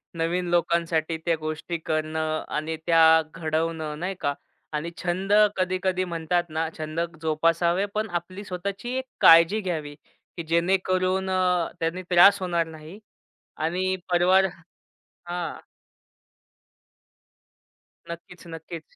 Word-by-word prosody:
नवीन 175 Hz, +2 st, -1 dB
लोकांसाठी, 170 Hz, -1 st, +1 dB
त्या 170 Hz, -1 st, +2 dB
गोष्टी 155 Hz, +2 st, -4 dB
करणं 155 Hz, 0 st, -1 dB
आणि 155 Hz, +2 st, -2 dB
त्या 160 Hz, -1 st, +6 dB
घडवणं, 160 Hz, -1 st, -2 dB
नाही 185 Hz, +2 st, -3 dB
का? 145 Hz, -, 0 dB, 0.4 s
आणि 150 Hz, +3 st, -2 dB
छंद 185 Hz, +3 st, -1 dB, 0.2 s
कधी-कधी 185 Hz, 0 st, 0 dB
म्हणतात 175 Hz, 0 st, -1 dB
ना, 160 Hz, +1 st, -1 dB
छंद 155 Hz, +1 st, -4 dB, 0.2 s
जोपासावे 165 Hz, +4 st, +1 dB
पण 215 Hz, 0 st, -1 dB
आपली 185 Hz, +4 st, -11 dB
स्वतःची 195 Hz, +6 st, -5 dB
एक 260 Hz, -, -2 dB, 0.2 s
काळजी 170 Hz, +6 st, +7 dB
घ्यावी, 155 Hz, -6 st, -4 dB, 0.4 s
की 170 Hz, -, -4 dB
जेणेकरून 185 Hz, +2 st, +1 dB
अ, 180 Hz, -2 st, +1 dB
त्यानी 165 Hz, +3 st, -2 dB
त्रास 195 Hz, +3 st, +7 dB
होणार 170 Hz, -2 st, 0 dB
नाही 160 Hz, +5 st, -11 dB, 0.6 s
आणि 185 Hz, +4 st, -1 dB, 0.2 s
परिवार 185 Hz, +2 st, +4 dB, 0.6 s
हां. 175 Hz, 0 st, -6 dB, 2.6 s
नक्कीच-नक्कीच. 165 Hz, -1 st, -10 dB
170 Hz, 110 wpm, -25 LUFS, 160-185 Hz, 2.6 s, काळजी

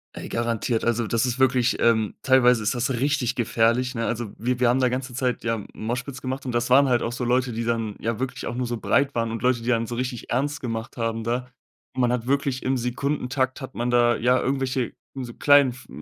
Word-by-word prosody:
Ey, -, -, -7 dB
garantiert. 115 Hz, 0 st, -1 dB
Also, 120 Hz, -1 st, 0 dB
das 115 Hz, +2 st, +1 dB
ist 125 Hz, 0 st, -2 dB
wirklich, 130 Hz, -2 st, +3 dB
ähm, 110 Hz, -2 st, +2 dB
teilweise 125 Hz, -3 st, +4 dB
ist 110 Hz, +4 st, 0 dB
das 120 Hz, +2 st, 0 dB
richtig 130 Hz, -1 st, 0 dB
gefährlich, 120 Hz, +2 st, +1 dB
ne? 115 Hz, 0 st, -1 dB
Also, 115 Hz, -3 st, -3 dB
wir 125 Hz, +2 st, -1 dB
wir 125 Hz, -, +4 dB
haben 130 Hz, +2 st, +3 dB
da 125 Hz, -, +3 dB
ganze 125 Hz, +1 st, -4 dB
Zeit 125 Hz, -2 st, -1 dB
ja 115 Hz, -2 st, -1 dB
Moshpits 125 Hz, +4 st, -4 dB
gemacht 130 Hz, +1 st, -4 dB
und 125 Hz, -, -2 dB
das 120 Hz, 0 st, 0 dB
waren 135 Hz, +2 st, +6 dB
halt 120 Hz, -1 st, +2 dB
auch 115 Hz, -, -2 dB
so 125 Hz, -, -4 dB
Leute, 125 Hz, 0 st, +1 dB
die 115 Hz, +1 st, -2 dB
dann 115 Hz, -3 st, -1 dB
ja 115 Hz, 0 st, -2 dB
wirklich 130 Hz, 0 st, -4 dB
auch 120 Hz, -, -4 dB
nur 125 Hz, -1 st, -2 dB
so 120 Hz, -, -3 dB
breit 140 Hz, +4 st, +1 dB
waren 115 Hz, -1 st, 0 dB
und 115 Hz, -, -4 dB
Leute, 125 Hz, -2 st, +2 dB
die 120 Hz, -, -3 dB
dann 115 Hz, -2 st, +1 dB
so 120 Hz, -, -4 dB
richtig 125 Hz, -1 st, -4 dB
ernst 145 Hz, +4 st, -1 dB
gemacht 115 Hz, -2 st, -5 dB
haben 115 Hz, -1 st, -2 dB
da. 120 Hz, +2 st, -2 dB, 0.5 s
Man 125 Hz, -1 st, +2 dB
hat 125 Hz, -1 st, -2 dB
wirklich 140 Hz, -1 st, 0 dB
im 130 Hz, +1 st, +1 dB
Sekundentakt 130 Hz, +2 st, -1 dB
hat 130 Hz, -, -7 dB
man 120 Hz, +1 st, -2 dB
da 120 Hz, -1 st, +3 dB
ja 125 Hz, +2 st, +3 dB
irgendwelche 130 Hz, -2 st, -1 dB, 0.2 s
so 125 Hz, -3 st, -5 dB
klein 145 Hz, 0 st, +5 dB
f 125 Hz, +1 st, -10 dB
125 Hz, 230 wpm, -24 LUFS, 115-130 Hz, 0.5 s, waren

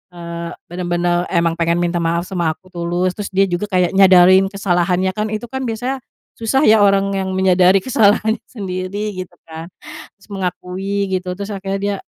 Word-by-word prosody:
eee, 170 Hz, 0 st, -6 dB, 0.2 s
benar-benar 175 Hz, 0 st, -1 dB
emang 170 Hz, -1 st, 0 dB
pengen 170 Hz, +1 st, +1 dB
minta 175 Hz, 0 st, -1 dB
maaf 170 Hz, +1 st, 0 dB
sama 175 Hz, -4 st, -2 dB
aku 185 Hz, +1 st, -23 dB
tulus, 175 Hz, +1 st, -1 dB
terus 205 Hz, +1 st, -6 dB
dia 195 Hz, +1 st, +2 dB
juga 185 Hz, +1 st, -2 dB
kayak 180 Hz, -3 st, +1 dB
nyadarin 190 Hz, 0 st, +6 dB
kesalahannya 185 Hz, -1 st, 0 dB
kan, 210 Hz, +2 st, -3 dB
itu 215 Hz, +2 st, -5 dB
kan 265 Hz, -1 st, -3 dB
biasanya 250 Hz, +4 st, -3 dB, 0.4 s
susah 265 Hz, +6 st, +1 dB
ya, 215 Hz, -1 st, +6 dB
orang 195 Hz, 0 st, +2 dB
yang 190 Hz, -1 st, -2 dB
menyadari 185 Hz, 0 st, +4 dB
kesalahannya 220 Hz, 0 st, +2 dB
sendiri, 200 Hz, -1 st, -5 dB
gitu 175 Hz, -, -21 dB, 0.2 s
kan, 165 Hz, +2 st, -9 dB, 0.5 s
terus -, -, -21 dB
mengakui 195 Hz, +1 st, -3 dB
gitu. 185 Hz, -1 st, -2 dB
Terus 200 Hz, +2 st, -5 dB
akhirnya 195 Hz, -1 st, -4 dB
dia 200 Hz, 0 st, -1 dB
190 Hz, 170 wpm, -18 LUFS, 175-200 Hz, 0.5 s, nyadarin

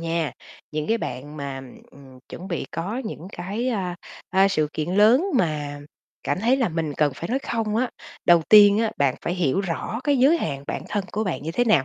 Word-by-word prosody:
nha, 165 Hz, -4 st, -1 dB, 0.4 s
những 155 Hz, 0 st, -3 dB
cái 225 Hz, +1 st, +2 dB
bạn 145 Hz, -, -6 dB
mà, 140 Hz, -2 st, -5 dB, 0.3 s
ừm, 140 Hz, -, -16 dB
ừm, 130 Hz, -1 st, -15 dB
chuẩn 185 Hz, +3 st, -8 dB
bị 170 Hz, -, -2 dB
có 190 Hz, +8 st, -3 dB
những 185 Hz, -5 st, -7 dB
cái, 205 Hz, +8 st, -3 dB
a, 185 Hz, -7 st, -2 dB, 0.3 s
a, 190 Hz, +1 st, +4 dB
sự 155 Hz, -6 st, +1 dB
kiện 155 Hz, +2 st, -3 dB
lớn 220 Hz, -, +5 dB
mà 150 Hz, -5 st, -1 dB, 0.4 s
cảm -, -, -1 dB
thấy 240 Hz, +5 st, +3 dB
là 250 Hz, -7 st, +1 dB
mình 160 Hz, -2 st, -2 dB
cần 150 Hz, -2 st, +2 dB
phải 170 Hz, -, -6 dB
nói 255 Hz, +4 st, +1 dB
"không" 225 Hz, -5 st, -2 dB
á. 245 Hz, +1 st, 0 dB, 0.3 s
Đầu 170 Hz, -1 st, +6 dB
tiên 205 Hz, -1 st, +8 dB
á, 225 Hz, -1 st, +1 dB
bạn 140 Hz, -2 st, +2 dB
phải 175 Hz, -, -1 dB
hiểu 175 Hz, -2 st, +1 dB
rõ 195 Hz, +5 st, -3 dB
cái 290 Hz, -1 st, +3 dB
giới 285 Hz, +7 st, +5 dB
hạn 140 Hz, -, -3 dB
bản -, -, -3 dB
thân 205 Hz, -2 st, -1 dB
của 215 Hz, +1 st, -1 dB
bạn 180 Hz, -7 st, -3 dB
như 160 Hz, -, -3 dB
thế 245 Hz, -, +2 dB
nào? 170 Hz, -, +4 dB
180 Hz, 225 wpm, -24 LUFS, 150-220 Hz, 0.4 s, tiên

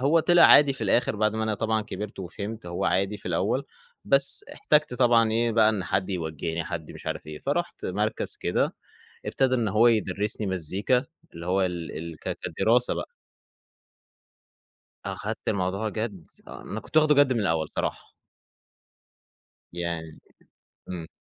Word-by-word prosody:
هو 150 Hz, +5 st, +4 dB
طِلع 175 Hz, +1 st, +5 dB
عادي 145 Hz, -1 st, +8 dB
في 130 Hz, -4 st, -5 dB
الآخِر 110 Hz, +2 st, +2 dB
بعد 110 Hz, 0 st, +1 dB
ما 110 Hz, -, -1 dB
أنا 110 Hz, -1 st, 0 dB
طبعًا 110 Hz, +1 st, 0 dB
كبرت 105 Hz, 0 st, -7 dB
وفهمت، 100 Hz, +3 st, -6 dB
هو 85 Hz, 0 st, -3 dB
عادي 100 Hz, +2 st, +1 dB
في 100 Hz, -, -13 dB
الأوّل، -, -, 0 dB, 0.4 s
بس 140 Hz, 0 st, +3 dB
احتاجت 150 Hz, -4 st, +2 dB
طبعًا 120 Hz, -3 st, +4 dB
إيه 115 Hz, +1 st, +1 dB
بقى، 110 Hz, -1 st, +5 dB
إن 105 Hz, -4 st, -1 dB
حد 95 Hz, +1 st, -1 dB
يوجّهني، 80 Hz, -1 st, -3 dB
حد 85 Hz, -4 st, -6 dB
مش -, -, -12 dB
عارِف -, -, -4 dB
إيه، 75 Hz, 0 st, -7 dB
فرُحت 170 Hz, -, -3 dB
مركز 105 Hz, +4 st, -2 dB
كده -, -, 0 dB, 0.5 s
ابتدى 130 Hz, -1 st, +1 dB
إن 120 Hz, -3 st, 0 dB
هو 110 Hz, +4 st, +4 dB
يدرّسني 105 Hz, -1 st, 0 dB
مزيكا، 95 Hz, -, 0 dB, 0.3 s
اللي 85 Hz, 0 st, -8 dB
هو 95 Hz, +2 st, +2 dB
ال 90 Hz, -3 st, -3 dB
ال 85 Hz, -1 st, -7 dB
ك -, -, -4 dB
كدراسة 120 Hz, +2 st, +2 dB
بقى. -, -, -5 dB, 2.0 s
أخدت -, -, -5 dB
الموضوع 100 Hz, +3 st, -1 dB
جَدّ، 105 Hz, -6 st, -5 dB, 0.2 s
آه -, -, -9 dB
أنا 105 Hz, -, -6 dB
كنت 155 Hz, -, -2 dB
واخدُه 155 Hz, -1 st, +5 dB
جَدّ 140 Hz, -2 st, +5 dB
من 120 Hz, -, 0 dB
الأول 80 Hz, -6 st, 0 dB
صراحة. -, -, -3 dB, 1.7 s
يعني 85 Hz, -2 st, -4 dB, 0.7 s
امم. 85 Hz, -3 st, -5 dB
105 Hz, 155 wpm, -26 LUFS, 90-120 Hz, 2.0 s, عادي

